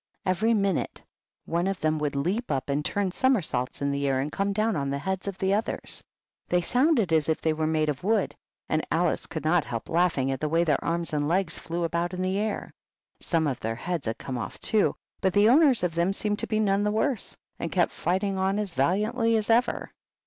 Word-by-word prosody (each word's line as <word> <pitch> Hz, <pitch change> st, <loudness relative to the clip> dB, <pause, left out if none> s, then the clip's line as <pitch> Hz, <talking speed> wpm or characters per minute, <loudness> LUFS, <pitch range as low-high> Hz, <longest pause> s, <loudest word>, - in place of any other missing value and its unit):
Every 215 Hz, +5 st, +2 dB
minute 195 Hz, -4 st, -1 dB, 0.4 s
one 170 Hz, +2 st, 0 dB
of 195 Hz, -1 st, -2 dB
them 155 Hz, 0 st, +1 dB
would 150 Hz, -2 st, -1 dB
leap 185 Hz, -, -1 dB
up 135 Hz, -1 st, -1 dB
and 145 Hz, +2 st, 0 dB
turn 200 Hz, +3 st, 0 dB
somersaults 180 Hz, -, 0 dB
in 140 Hz, -, +1 dB
the 140 Hz, 0 st, -1 dB
air 135 Hz, -1 st, +1 dB
and 145 Hz, +3 st, -2 dB
come 200 Hz, +4 st, 0 dB
down 215 Hz, +1 st, +1 dB
on 140 Hz, -2 st, -1 dB
the 140 Hz, -, -1 dB
heads 190 Hz, +6 st, -3 dB
of 195 Hz, -2 st, -4 dB
the 190 Hz, 0 st, +1 dB
others. 215 Hz, +3 st, -2 dB, 0.5 s
They 180 Hz, 0 st, +3 dB
sounded 245 Hz, -, +2 dB
as 155 Hz, -1 st, +2 dB
if 160 Hz, -, +1 dB
they 160 Hz, -, +1 dB
were 155 Hz, 0 st, -1 dB
made 155 Hz, -1 st, +1 dB
of 150 Hz, 0 st, -2 dB
wood, 210 Hz, 0 st, +1 dB, 0.3 s
and 155 Hz, 0 st, 0 dB
Alice 170 Hz, 0 st, +1 dB
could 160 Hz, -, -5 dB
not 165 Hz, 0 st, +3 dB
help 115 Hz, -1 st, -5 dB
laughing 165 Hz, -6 st, +2 dB
at 135 Hz, -, -2 dB
the 155 Hz, -, -1 dB
way 165 Hz, +2 st, +3 dB
their 150 Hz, -5 st, +1 dB
arms 170 Hz, 0 st, -2 dB
and 145 Hz, -1 st, 0 dB
legs 180 Hz, +1 st, 0 dB
flew 170 Hz, +1 st, -3 dB
about 170 Hz, +2 st, -1 dB
in 185 Hz, -, -2 dB
the 190 Hz, +2 st, 0 dB
air. 215 Hz, 0 st, -3 dB, 0.5 s
Some 165 Hz, -2 st, 0 dB
of 135 Hz, -4 st, -1 dB
their 115 Hz, +1 st, -2 dB
heads 165 Hz, +1 st, -3 dB
had 110 Hz, -, -2 dB
come 130 Hz, -2 st, -5 dB
off, -, -, -6 dB
too, 215 Hz, -2 st, +2 dB, 0.3 s
but 190 Hz, -2 st, +2 dB
the 205 Hz, +2 st, +5 dB
owners 270 Hz, -, +5 dB
of 175 Hz, -2 st, 0 dB
them 170 Hz, +3 st, +1 dB
seemed 210 Hz, +1 st, -2 dB
to -, -, -1 dB
be 215 Hz, -, 0 dB
none 200 Hz, -1 st, +2 dB
the 210 Hz, -, +2 dB
worse, 220 Hz, +2 st, -1 dB, 0.2 s
and 170 Hz, -, -3 dB
kept 175 Hz, -2 st, +2 dB
fighting 190 Hz, +3 st, -1 dB
on 190 Hz, +1 st, +1 dB
as 205 Hz, -4 st, -2 dB
valiantly 215 Hz, -, +2 dB
as 215 Hz, +1 st, 0 dB
ever. 240 Hz, +2 st, +1 dB
175 Hz, 230 wpm, -27 LUFS, 155-205 Hz, 0.5 s, the